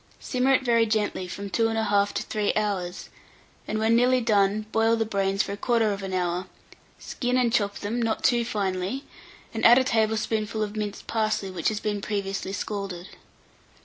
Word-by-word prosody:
Simmer 260 +1 +1
it 260 - 0
very 230 -2 +3
gently 210 -4 -1
from 200 +2 -6
2 225 +6 +2
1/2 205 -3 +1
to - - -2
3 210 -1 -1
hours, 195 -4 -2 0.6
and 215 - -2
when 220 +1 +3
nearly 250 +2 +4
done, 210 -2 +2
boil 225 +1 +3
the 225 -1 0
brains 195 -1 0
for 200 - -4
1/4 205 -4 0
hour; 180 0 -1 0.5
skin 250 0 -2
and 240 -2 +2
chop 200 -3 +1
them, 225 +4 -3
not 225 -1 -1
too 240 -2 +3
finely, 200 +3 -2 0.5
and 225 - -4
add 240 +1 +8
a 265 - +4
tablespoonful 220 -1 0
of 210 0 -5
minced 210 -1 -4
parsley 215 -3 -1
which 175 -3 -2
has 215 -1 0
been 205 -2 -2
previously 195 -2 -3
scalded. 195 -3 -5
215 Hz, 170 wpm, -26 LUFS, 200-225 Hz, 0.6 s, add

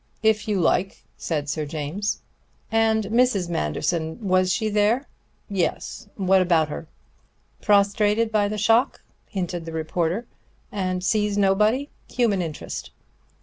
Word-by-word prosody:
"If 220 -1 +2
you 205 -3 +1
like," 185 +2 +1
said 150 -3 -3
Sir 150 0 -2
James. 160 +7 -3 0.5
"And 225 -1 +3
Mrs. 215 -4 +2
Manderson? 160 - -1
Was 185 0 +3
she 220 +2 0
there?" 215 +6 +2 0.4
"Yes. 195 +2 -2
What 190 -1 +3
about 165 -4 +3
her?" 155 +2 -6 0.7
"Prostrated 210 +2 +3
by 210 -2 +2
the 210 +1 -3
shock," 225 +4 +2 0.3
hinted 175 -3 -3
the 165 - -7
reporter, 165 +6 -1 0.5
"and 185 -2 -2
sees 210 0 +1
nobody. 210 +8 +2 0.2
Human 225 -6 +1
interest." 155 - -5
200 Hz, 125 wpm, -24 LUFS, 170-215 Hz, 0.7 s, And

